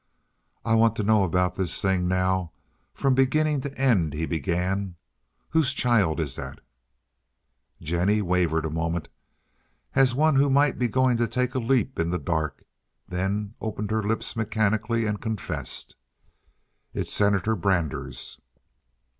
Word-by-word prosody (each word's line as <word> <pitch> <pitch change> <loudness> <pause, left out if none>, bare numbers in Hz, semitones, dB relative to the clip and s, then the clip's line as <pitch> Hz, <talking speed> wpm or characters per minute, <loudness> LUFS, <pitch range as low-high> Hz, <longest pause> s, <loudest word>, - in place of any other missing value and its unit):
"I 115 - +2
want 115 0 +4
to 105 - -2
know 105 -1 +4
about 90 0 +1
this 90 -3 -1
thing 95 -2 +1
now 90 -1 0 0.4
from 135 -1 +1
beginning 145 +2 +2
to 140 +1 -6
end," 105 - +2
he 80 +2 -1
began. 90 +3 -2 0.5
"Whose 160 -5 +2
child 105 -10 +2
is 75 -5 -2
that?" - - -7 1.2
Jennie 90 +6 +1
wavered 85 -3 +1
a 80 - -3
moment, 80 0 -2 0.8
as 130 -2 +4
one 155 0 +3
who 140 +1 +4
might 140 +2 +3
be 125 - +2
going 130 +1 +2
to 120 0 +1
take 125 0 -1
a 130 - 0
leap 130 +2 0
in 85 0 +1
the 90 - 0
dark, 80 -5 -2 0.4
then 100 +3 -2
opened 105 -1 -4
her 110 0 +1
lips 110 +2 -1
mechanically 110 +1 0
and 105 -1 -2
confessed: 110 -5 -4 1.0
"It's - - -1
Senator 100 +1 +2
Brander's." 85 -5 -2
105 Hz, 140 wpm, -25 LUFS, 90-120 Hz, 1.2 s, want